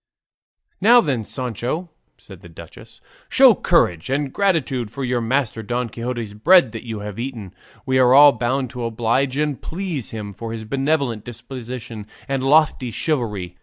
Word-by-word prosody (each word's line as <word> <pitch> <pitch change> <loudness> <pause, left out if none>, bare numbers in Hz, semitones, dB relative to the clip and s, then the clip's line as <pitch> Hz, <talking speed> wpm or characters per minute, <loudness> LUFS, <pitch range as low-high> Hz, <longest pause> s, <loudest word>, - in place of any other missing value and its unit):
"Now 235 +5 +7
then, 135 - 0
Sancho!" 130 - -4 0.3
said 95 -3 -14
the 90 - -13
duchess, 80 - -14 0.3
"show - - +7
courage, 85 +3 +1
and 135 0 -1
gratitude 140 - 0
for 135 +5 -6
your 125 -1 -1
master 115 -1 -1
Don 120 +2 -3
Quixote's 115 -2 -5
bread 140 - +5
that 115 -1 -7
you 110 -3 -6
have 105 +1 -7
eaten; 115 -7 -6 0.3
we 130 0 +1
are 130 0 +5
all 145 +1 +9
bound 125 +1 -2
to 125 -2 -6
oblige 120 +4 0
and 150 -2 -1
please 170 - -4
him 105 -2 -7
for 115 +3 -7
his 110 -1 -6
benevolent 135 -2 -1
disposition 120 -2 -8 0.2
and 135 -1 -2
lofty 145 -3 +3
chivalry. 105 - -3
125 Hz, 160 wpm, -21 LUFS, 110-140 Hz, 0.3 s, all